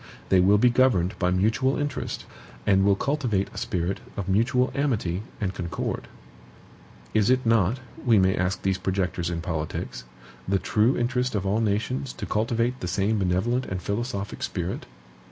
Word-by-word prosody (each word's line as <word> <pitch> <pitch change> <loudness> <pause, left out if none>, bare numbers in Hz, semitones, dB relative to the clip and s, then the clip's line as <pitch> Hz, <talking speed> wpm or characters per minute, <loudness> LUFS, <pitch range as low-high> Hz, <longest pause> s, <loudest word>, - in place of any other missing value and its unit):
They 95 - +5
will 100 +3 +5
be 120 +3 +5
governed 120 -8 +3
by 90 - +2
mutual 110 +9 +2
interest, 145 -3 -3 0.4
and 95 -1 +4
will 100 0 +4
cultivate 120 -6 0
a - - -10
spirit 90 +2 -2 0.2
of 100 -2 -3
mutual 125 +6 +2
amity 110 -11 0 0.2
and 100 -4 -1
concord. 85 -2 -4 1.1
Is 110 +1 +3
it 130 0 +3
not 115 +1 +3 0.2
(we 115 -3 +5
may 95 0 +4
ask 90 +1 -1
these 95 -1 +1
projectors 90 -3 -1
in 85 -1 -3
politics) 80 -7 -4 0.4
the 100 +1 +2
true 105 +7 +2
interest 125 0 0
of 100 -1 -1
all 100 +3 +1
nations 115 +5 -1
to - - -6
cultivate 115 +3 0
the 90 - -4
same 100 +4 +1
benevolent 100 +8 +1
and 95 - -3
philosophic 100 +1 -3
spirit? 90 0 -3
100 Hz, 160 wpm, -26 LUFS, 95-120 Hz, 1.1 s, They